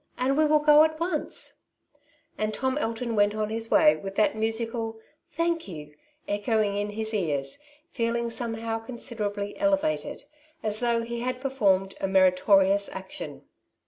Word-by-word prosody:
and 260 +2 +1
we 310 - +4
will 305 0 +5
go 300 0 +6
at 315 0 0
once/' 335 -3 -2 0.8
And 215 0 -2
Tom 260 0 -1
Alton 230 +1 -2
went 205 0 +3
on 215 0 -2
his 225 0 -3
way 305 0 +6
with 195 0 -7
that 215 +1 +2
musical 225 0 -2 0.2
" - - -46
thank 335 -3 0
you 150 -5 -9 0.2
" 300 0 -40
echoing 205 0 0
in 205 +1 -1
his 220 +1 -4
ears, 145 -9 0 0.3
feeling 235 -1 -1
somehow 225 -1 -2
considerably 220 -4 -4
elevated, 300 +1 0 0.4
as 215 -1 0
though 235 -1 +1
he 235 0 -4
had 250 +1 -2
performed 200 -8 +1
a 195 - +1
meritorious 195 +1 +4
action. 190 0 -7
225 Hz, 155 wpm, -26 LUFS, 205-255 Hz, 0.8 s, go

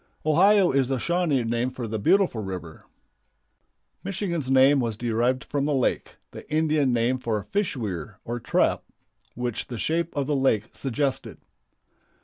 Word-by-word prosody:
Ohio 185 +5 +5
is 135 -2 +2
the 135 0 -1
Shawnee 170 -3 0
name 120 +2 -1
for 125 -2 -6
"the 110 0 -3
beautiful 175 - +2
river." 90 -5 -7 1.2
Michigan's 175 -7 -2
name 135 +2 +5
was 115 -4 -2
derived 120 +2 0
from 140 -1 -2
the 150 -1 +1
lake, 130 - -1 0.2
the - - -12
Indian 155 -3 +2
name 120 +2 +1
for 110 -4 -2
fish 200 -7 -2
weir 100 -4 -5
or 120 +1 -3
trap, - - +1 0.5
which 125 -2 -3
the 120 - -6
shape 165 +6 -1
of 140 - +1
the 145 +1 0
lake 115 -5 +1
suggested. 135 +1 -3
130 Hz, 150 wpm, -25 LUFS, 115-155 Hz, 1.2 s, Ohio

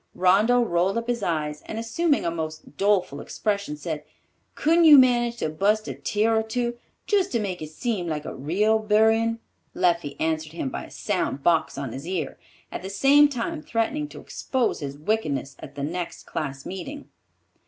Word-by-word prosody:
Rondeau 210 +7 +4
rolled 185 0 +1
up 230 - -2
his 240 -1 -1
eyes, 150 -4 -2
and 220 - -5
assuming 285 +7 0
a 170 - +1
most 155 -2 -6
doleful 195 -6 +1
expression, 200 -7 -2
said, 150 -1 -4 0.5
"Couldn't 330 +2 +4
you 300 -2 +10
manage 240 -2 +4
to 155 - -1
bust 205 +7 +1
a - - -3
tear 220 +2 +1
or 220 - +3
two, 240 +2 -2 0.3
just 395 -3 +2
to 235 - +2
make 190 -5 -3
it 155 - -5
seem 185 +2 -2
like 155 -2 -3
a - - -5
real 205 +11 +1
buryin'?" 220 +2 +3 0.4
Leffie 170 -5 0
answered 160 -1 -1
him 150 -5 -3
by - - -5
a - - -14
sound 135 - -2
box 160 -5 +2
on 140 -4 -4
his 135 +7 -7
ear, 175 -5 -3 0.3
at - - -5
the 190 - -6
same 280 +8 +5
time 290 +5 -3
threatening 295 +2 -1
to - - -11
expose 255 -3 -1
his 140 -2 -5
wickedness 145 - -1
at 140 - -10
the 140 - -4
next 175 +4 -4
class 135 -2 -4
meeting. 275 +11 -7
200 Hz, 185 wpm, -25 LUFS, 155-235 Hz, 0.5 s, you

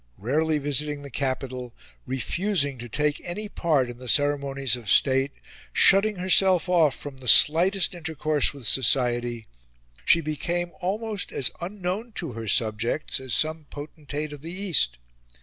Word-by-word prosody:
Rarely 150 +8 0
visiting 145 0 -3
the 140 - -10
capital, 130 -2 -4 0.3
refusing 145 - -1
to 120 0 -8
take 150 +4 -1
any 210 +5 -5
part 155 -10 0
in 120 0 -9
the 125 -1 -4
ceremonies 140 -2 +1
of 120 -5 -8
state, 135 +5 +3 0.4
shutting 200 +2 +5
herself 185 -1 +3
off 165 -6 +3
from 145 -2 -9
the 130 -1 -10
slightest 180 - +5
intercourse 155 -3 0
with 140 -4 -11
society, 120 -1 +2 0.6
she 165 - +4
became 170 +3 -3
almost 210 +3 -3
as 130 - -1
unknown 195 +5 -4
to 165 -9 -4
her 115 -1 -7
subjects 115 +6 0
as 130 -5 -3
some 155 0 -1
potentate 150 0 -7
of 145 - -10
the 165 +2 -7
East. 175 - 0
145 Hz, 145 wpm, -25 LUFS, 130-175 Hz, 0.6 s, shutting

